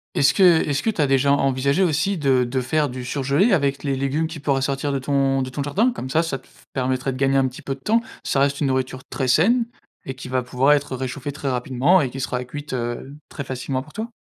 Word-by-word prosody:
Est-ce 140 - +4
que 195 - +3
est-ce 160 -5 +4
que - - 0
tu 205 -7 -1
as 145 - +3
déjà 135 +1 +3
envisagé 140 +4 +2
aussi 180 +4 +1
de 135 -5 +2
de 130 +2 -1
faire 150 +3 +1
du 125 -1 -6
surgelé 140 - +1
avec 140 -6 +1
les 140 -2 -1
légumes 140 +4 0
qui 160 -1 -8
pourraient 140 -1 0
sortir 140 +1 -1
de 135 - 0
ton 135 0 +1
de 130 - -3
ton 140 +3 -4
jardin? 195 - +1
Comme 130 - -6
ça, 160 +4 +2
ça 155 -5 -2
te - - -24
f - - -23
permettrait 130 0 -1
de 130 - -6
gagner 135 0 +2
un 135 -1 +4
petit 125 - -11
peu 135 - -4
de 135 - -22
temps. 225 +7 +2 0.2
Ça 135 - 0
reste 140 +1 +1
une 145 - +2
nourriture 130 -1 -2
très 130 - -2
saine 225 - +4 0.4
et 135 - -4
qui 130 -1 -9
va 130 0 0
pouvoir 125 +3 +2
être 145 -2 +1
réchauffée 130 +2 -4
très 140 0 -3
rapidement 130 +7 +2
et 135 -6 0
qui 135 +2 -6
sera 125 -1 -2
cuite, 145 +3 -8
heu, 120 +2 -4
très 140 - -6
facilement 130 0 -3
pour 150 - -14
toi. 220 +5 -4
135 Hz, 260 wpm, -22 LUFS, 130-150 Hz, 0.4 s, Est-ce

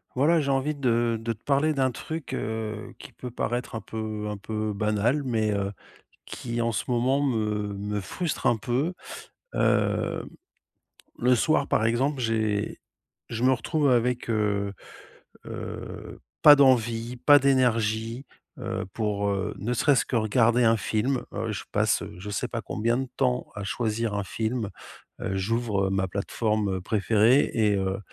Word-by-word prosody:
Voilà 155 +6 +4
j'ai 140 -2 -1
envie 135 +3 +1
de 120 -4 +1
de 115 0 -1
te 110 - -21
parler 145 +2 +2
d'un 135 -2 +1
truc, 155 +3 -6
heu, 110 0 -4
qui - - -11
peut 125 - -8
paraître 120 0 -3
un 110 - -3
peu 110 -1 -4
un 105 - -4
peu 110 +1 -3
banal, 105 +7 +1
mais 110 -4 +1
heu, 100 0 -1 0.5
qui 120 -1 -4
en 115 0 +1
ce - - -1
moment 130 +3 +2
me 105 -6 0
me 105 +1 -3
frustre 155 - -3
un 120 - +3
peu. 130 - -1 0.6
Hem, - - +1 0.9
le 125 +1 +4
soir 145 +2 +2
par - - +1
exemple, 130 +5 +1
j'ai 110 -3 -1 0.5
je 115 +1 -3
me 130 - +5
retrouve 145 +4 0
avec, 125 0 +1
heu 100 -2 0 0.7
heu, - - -7 0.2
pas 150 -1 +11
d'envie, 120 -3 +3
pas 145 +4 +6
d'énergie, 115 -2 +1 0.3
heu, - - -3
pour, 105 -2 -1
heu, 100 0 -2
ne 115 +5 -1
serait-ce 135 +2 +3
que - - -3
regarder 115 +2 +3
un 115 0 +4
film. 115 +6 0
Heu, 110 +2 -2
je 100 - -4
passe, - - +2
heu, - - -9
je 105 +3 -7
sais 115 +5 -2
pas 115 - -3
combien 115 +3 0
de 135 - -3
temps 125 -2 +1
à 100 - -5
choisir 110 +1 -1
un 100 - -1
film. 110 +1 -2 0.5
Heu, 95 - -2
j'ouvre 105 -1 0
ma 95 -1 0
plateforme 100 0 -1
préférée 110 +6 +3
et 105 -3 +3
heu, 95 0 -1
115 Hz, 160 wpm, -26 LUFS, 105-125 Hz, 0.9 s, pas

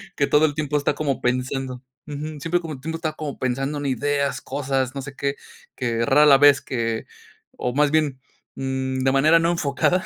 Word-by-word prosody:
que 140 - +1
todo 150 +1 +4
el 145 - 0
tiempo 150 -1 -1
está 145 0 +1
como 145 -2 -2
pensando. 130 +1 -2 0.2
Ujú, 150 +1 -6
siempre 165 +3 0
como 160 -2 -6
entiendo 160 +5 -5
estaba 155 -2 -3
como 150 -3 -5
pensando 135 +3 -1
en 145 - -5
ideas, 140 +2 0
cosas, 135 -1 -2
no 135 - -3
sé 145 +1 -8
qué, 140 0 -2 0.4
que 115 -2 -1
rara 150 +4 +5
la 140 -2 +8
vez 145 -1 +6
que, 115 -3 -2 0.5
o 125 - -2
más 145 0 +3
bien, 150 -4 +1 0.4
mm, 130 0 -2
de 130 0 +2
manera 155 +5 +5
no 165 +1 +2
enfocada, 170 +3 0
140 Hz, 195 wpm, -23 LUFS, 130-150 Hz, 0.5 s, la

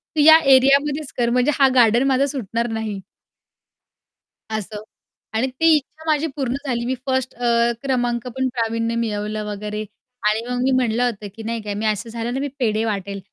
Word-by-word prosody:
तू 305 - +3
या 315 +2 +9 0.2
एरियामध्येच 280 +2 +2
कर 240 -1 +2
म्हणजे 250 +4 +2
हा 270 - +7
गार्डन 235 0 +5
माझा 270 0 +3
सुटणार 235 -4 -3
नाही". 220 -3 -4 1.6
असं. 210 0 -6 0.5
आणि 230 +4 +1
ती 320 +5 +3
इच्छा 300 +2 -7
माझी 305 +1 +2
पूर्ण 260 -4 -1
झाली 235 -3 -1
मी 260 - 0
फर्स्ट 260 -1 -1
अ, 235 -1 +2
क्रमांक 245 -3 -1
पण 260 0 0
प्रावीण्य 230 -1 -1
मिळवलं 215 -2 -2
वगैरे 210 +1 -4 0.4
आणि 215 +1 +1
मग 250 0 -2
मी 265 - +2
म्हटलं 245 -2 +1
होतं, 215 -4 -3
की 225 - -9
नाही 230 +1 -3
का 205 -1 -4
मी 215 +2 -2
असं 215 +2 -1
झालं 230 +1 -4
ना 270 - -2
मी 285 - -2
पेढे 220 -3 0
वाटेल 200 -2 -3
235 Hz, 180 wpm, -21 LUFS, 220-260 Hz, 1.6 s, या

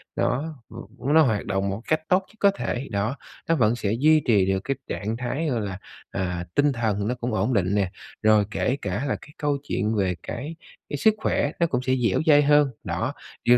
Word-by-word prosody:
nó, 150 +5 -1
ừm, 135 +4 -5
nó 160 - +7
hoạt 110 -9 +1
động 95 0 -1
một 100 +3 -4
cách 155 0 +2
tốt 185 - +5
nhất - - -22
có 200 - +5
thể, 140 -8 -3
đó, 105 +5 -1 0.3
nó 165 - +4
vẫn 115 -5 +3
sẽ 105 -4 -1
duy 155 +1 +5
trì 105 -5 +4
được 95 0 +1
cái 135 - -1
trạng 110 +3 -3
thái, 135 +6 -2
gọi 120 -4 0
là, 100 -2 -4 0.3
à, 90 -2 -2
tinh 145 0 +4
thần 110 -5 -1
nó 125 - 0
cũng 120 -1 -3
ổn 110 +5 +1
định 100 -2 +1
nè, 95 -3 +1 0.3
rồi 110 -1 +5
kể 125 - 0
cả 100 +8 -2
là - - 0
cái 145 - -15
câu 145 -1 0
chuyện 110 -5 -1
về 95 -3 +1
cái 145 +7 -5 0.3
cái 145 - -2
sức 220 +9 +4
khỏe 145 -8 0
nó 170 - +3
cũng 125 -5 -1
sẽ 130 0 +1
dẻo 115 -7 +1
dai 145 -2 +7
hơn, 145 0 +5
đó. - - -2 0.3
Điều 120 +1 +6
120 Hz, 225 wpm, -25 LUFS, 100-145 Hz, 0.3 s, nó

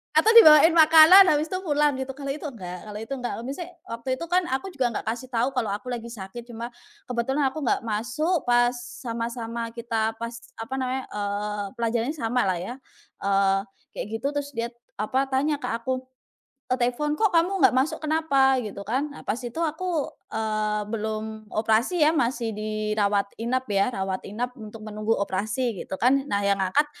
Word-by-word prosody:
atau 380 +9 +5
dibawain 320 -8 +9
makanan 325 +4 +8
habis 305 -1 +2
tuh 370 - -1
pulang 295 -5 +2
gitu. 265 0 -4
Kalau 275 -1 -4
itu 300 +2 -5
enggak 180 -7 -8
kalau 210 - -8
itu 235 - -13
enggak. 250 -3 -3
Misalnya 335 +7 -6 0.2
waktu 235 +3 -2
itu 295 - -7
kan 360 0 +2
aku 270 +9 -2
juga 265 -7 0
nggak - - -2
kasih 250 +2 -7
tahu 245 +1 0
kalau 250 -4 -1
aku 230 +5 -7
lagi 235 -1 -4
sakit, 230 +1 -8
cuma 235 +1 -7 0.4
kebetulan 265 +4 0
aku 310 - -6
nggak 255 -5 0
masuk 255 - -1
pas 240 0 +4 0.3
sama-sama 230 0 -4
kita, 225 -2 -1
pas 230 +1 -5 0.2
apa 225 +4 -7
namanya 260 0 -2
eee, 205 0 -3
pelajarannya 235 +4 -1
sama 245 -4 0
lah 185 - +1
ya, 180 +7 -5 0.5
eee, 195 0 +2 0.3
kayak - - -5
gitu. 230 +5 -2
Terus 290 -1 -3
dia 230 +1 -2 0.2
apa 260 +6 0
tanya 285 +2 0
ke - - -4
aku 255 +3 -2 0.7
lewat 255 +1 -1
telepon, 270 +5 0
"Kok 430 +5 +2
kamu 345 +2 +3
nggak - - +6
masuk, 275 +4 0
kenapa?" 280 -4 +3
gitu 210 -4 -5
kan. 255 +8 -1
Nah, - - -10
pas 230 - -2
itu 245 +5 -5
aku, 325 -1 -1 0.2
eee, 215 -1 -1
belum 220 0 -4
operasi, 225 +10 +2
ya 300 - +6
masih 245 -6 0
dirawat 210 -1 -1
inap, 250 0 -2
ya 200 +5 +1
rawat 190 -1 -3
inap 235 +5 -3
untuk 215 0 -10
menunggu 215 +1 -1
operasi 210 +3 -2
gitu - - -5
kan. 270 +3 +3
Nah, 200 -6 0
yang 200 0 +2
ngangkat 190 +11 +2
240 Hz, 180 wpm, -25 LUFS, 215-285 Hz, 0.7 s, dibawain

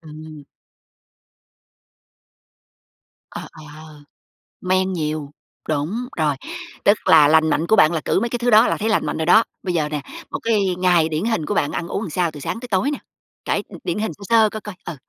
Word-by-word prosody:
ừm. 155 -1 -11 2.9
Ờ, - - -7
ờ. 155 -1 -13 0.6
Men 185 +1 +1
nhiều. 155 -3 -3 0.4
Đúng, 155 +8 -1 0.2
rồi, 150 -3 +1 0.5
tức 205 +1 +5
là 145 -1 +7
lành 160 +1 +4
mạnh 165 +2 0
của 220 - +4
bạn 155 - +5
là 160 - -2
cữ - - +1
mấy 235 - -1
cái 240 0 -3
thứ 245 0 0
đó 220 +2 +6
là - - 0
thấy 220 +1 -1
lành 215 - +1
mạnh - - -3
rồi 160 - -1
đó. 220 +6 +6 0.2
Bây 180 - -2
giờ 155 -3 0
nè, 150 -1 -3 0.3
một - - -3
cái 200 -5 +1
ngày 175 -3 +3
điển 160 +6 -2
hình 220 -10 -1
của 205 - -2
bạn 145 -8 0
ăn 170 - -4
uống 195 - -3
làm 220 - -5
sao 170 +1 0
từ 150 - -10
sáng 225 - -4
tới 250 - -8
tối 215 +8 0
nè? 290 - -4 0.5
Kể - - 0
đ - - -11
điển - - -2
hình 215 -7 -2
sơ 200 - -14
sơ 225 -2 +5
coi 215 -1 -7
coi, 210 -3 -8
ừ. 170 - -5
175 Hz, 210 wpm, -21 LUFS, 155-210 Hz, 2.9 s, là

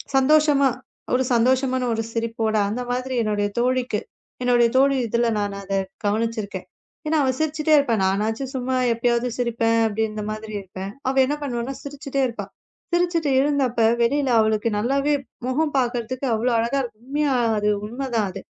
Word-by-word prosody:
சந்தோஷமா 280 0 +4 0.4
ஒரு 255 +1 +3
சந்தோஷமான 255 +2 +2
ஒரு 225 - -1
சிரிப்போடு 225 -1 -1
அந்த 225 +5 -3
மாதிரி 255 +1 -2
என்னுடைய 205 -1 0
தோழிக்கு. 250 -3 0 0.4
என்னுடைய 245 -1 +4
தோழி 275 +1 +4
இதுல 235 +2 +1
நான் 205 -1 -2
அதை 195 0 -2 0.3
கவனிச்சுருக்கேன். 210 -2 -2 0.4
ஏன்னா 310 +1 +1
அவ 265 - +2
சிரிச்சிட்டே 315 0 +1
இருப்பா. 265 -6 +2
நானாச்சு 215 +7 0
சும்மா 260 0 -1 0.2
எப்பயாவது 235 +1 +1
சிரிப்பேன் 230 -1 +1
அப்படின்னு 220 0 -2
இந்த 210 - -4
மாதிரி 215 0 -7
இருப்பேன். 190 +1 -7 0.2
அவ 265 - -1
என்ன 290 +3 -1
பண்ணுவானா 255 -1 -3
சிரிச்சிட்டே 280 -1 -3
இருப்பா. 235 - -6 0.5
சிரிச்சுட்டு 345 -3 +1
இருந்தப்ப 270 -5 +1 0.2
வெளியில 275 +3 +2
அவளுக்கு 220 +1 +2
நல்லாவே 275 +7 +1 0.3
முகம் 295 +3 0
பாக்குறதுக்கு 250 +1 -1
அவ்வளவு 235 +2 +1
அழகா 235 +5 0
இருக்கும். 230 -3 -8
உண்மையா! 290 -1 +1 0.2
அது 210 0 +1 0.2
உண்மை 260 +5 -5
தான். 215 -3 +2
அது - - -8
245 Hz, 150 wpm, -23 LUFS, 220-275 Hz, 0.5 s, சந்தோஷமா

